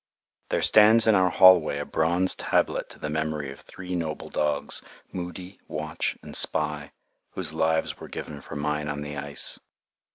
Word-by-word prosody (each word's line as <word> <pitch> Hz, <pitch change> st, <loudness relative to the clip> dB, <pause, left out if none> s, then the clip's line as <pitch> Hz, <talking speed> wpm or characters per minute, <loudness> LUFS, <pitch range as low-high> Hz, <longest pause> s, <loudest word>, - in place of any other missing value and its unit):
There -, -, 0 dB
stands 110 Hz, +1 st, +6 dB
in 110 Hz, -, +5 dB
our 95 Hz, -2 st, +3 dB
hallway 90 Hz, -5 st, +5 dB
a 75 Hz, -, -4 dB
bronze 85 Hz, +5 st, +1 dB
tablet -, -, -1 dB
to -, -, -12 dB
the -, -, -5 dB
memory 75 Hz, -2 st, -3 dB
of 70 Hz, -, -12 dB
three 90 Hz, -1 st, -9 dB
noble 80 Hz, -3 st, -5 dB
dogs, 75 Hz, -1 st, +2 dB, 0.3 s
Moody, 90 Hz, +1 st, -8 dB
Watch, 75 Hz, 0 st, -3 dB
and -, -, -9 dB
Spy, 75 Hz, -2 st, +1 dB, 0.4 s
whose 80 Hz, -5 st, -4 dB
lives 80 Hz, 0 st, 0 dB
were -, -, -9 dB
given 75 Hz, -2 st, -8 dB
for -, -, -10 dB
mine 75 Hz, 0 st, -2 dB
on 75 Hz, 0 st, -4 dB
the 75 Hz, 0 st, -6 dB
ice. 70 Hz, 0 st, -2 dB
80 Hz, 165 wpm, -25 LUFS, 75-90 Hz, 0.4 s, stands